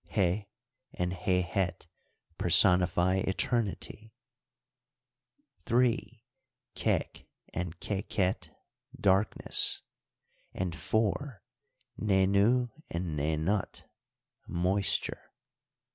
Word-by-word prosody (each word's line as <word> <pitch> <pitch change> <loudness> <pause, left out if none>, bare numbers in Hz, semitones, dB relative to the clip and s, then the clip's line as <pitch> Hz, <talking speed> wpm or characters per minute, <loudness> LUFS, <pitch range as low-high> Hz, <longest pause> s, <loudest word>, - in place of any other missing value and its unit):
Heh 95 +3 +1 0.5
and 90 0 -1
Hehet 90 -1 0 0.5
personify 90 +1 +4
eternity; 110 +2 -1 1.5
3. 120 -1 +1 0.5
Kek - - -1 0.3
and 90 -1 -4
Keket, 95 -2 -1 0.5
darkness; 100 +2 +2 0.7
and, 90 -2 -2
4. 110 - -1 0.6
Nenu 100 +5 +3 0.2
and 85 -2 -3
Nenut, 80 +7 -1 0.6
moisture. 95 +3 0
95 Hz, 60 wpm, -30 LUFS, 90-105 Hz, 1.5 s, personify